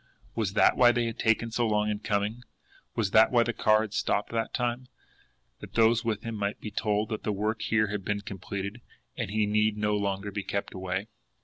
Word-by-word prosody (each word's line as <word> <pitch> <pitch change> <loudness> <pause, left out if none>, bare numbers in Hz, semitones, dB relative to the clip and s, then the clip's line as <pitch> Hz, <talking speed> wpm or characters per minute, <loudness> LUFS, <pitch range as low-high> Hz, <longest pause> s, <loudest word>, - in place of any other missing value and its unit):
Was 100 -4 -1
that - - +4
why 120 -1 +7
they 120 0 0
had 115 -1 -4
taken 115 0 +1
so 120 +1 +1
long 105 -1 +1
in 105 -1 -1
coming? 105 +3 -1 0.5
Was 105 -4 0
that 110 +1 +6
why 120 -2 +5
the 120 - -2
car 110 -1 +3
had 110 -2 -5
stopped 105 - 0
that 115 -1 -1
time 125 0 -2 0.7
that - - -11
those 115 +1 +4
with 110 -2 -2
him 115 - -4
might 100 -1 -2
be 105 - -6
told 105 +1 0
that 110 - -3
the 105 - -1
work 105 +2 -1
here 110 -1 +2
had 105 -1 -3
been 105 +1 -2
completed, 100 +2 -6 0.3
and - - -3
he 105 +1 +1
need 105 +1 +1
no 105 0 +1
longer 100 0 -2
be 100 - -3
kept 100 +1 -4
away? 95 +1 -3
105 Hz, 215 wpm, -28 LUFS, 100-115 Hz, 0.7 s, why